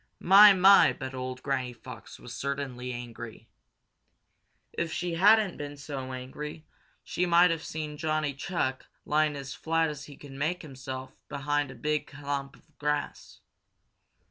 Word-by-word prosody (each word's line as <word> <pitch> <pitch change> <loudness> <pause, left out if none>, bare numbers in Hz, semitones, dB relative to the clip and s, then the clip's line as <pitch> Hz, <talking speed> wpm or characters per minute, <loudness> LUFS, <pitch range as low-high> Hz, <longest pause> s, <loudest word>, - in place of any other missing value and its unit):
My, 200 +3 +9
my, 195 +1 +7
but 130 -1 -7
old 130 0 -5
Granny 130 -3 -1
Fox - - -11
certainly 135 -3 -4
was 125 - -3
angry! 120 -2 -9 1.3
If 170 -1 -2
she 175 +1 -2
hadn't 205 +2 +4
been 145 0 -6
so 135 -2 -6
angry 150 +5 -7 0.4
she 180 - -1
might 175 0 +6
have 165 -1 -2
seen 150 -1 -5
Johnny 155 -2 -1
Chuck 135 -3 -3 0.2
lying 150 0 +2
as 135 -1 -6
flat 165 0 0
as 150 -2 -7
he 145 - -12
could 145 - -12
make 155 +7 -2
himself 130 -2 -7 0.2
behind 145 0 -1
a 130 - -9
big 150 +5 -1
clump 140 -1 -5
of 155 - -26
grass. 150 0 -3
145 Hz, 145 wpm, -28 LUFS, 130-160 Hz, 1.3 s, My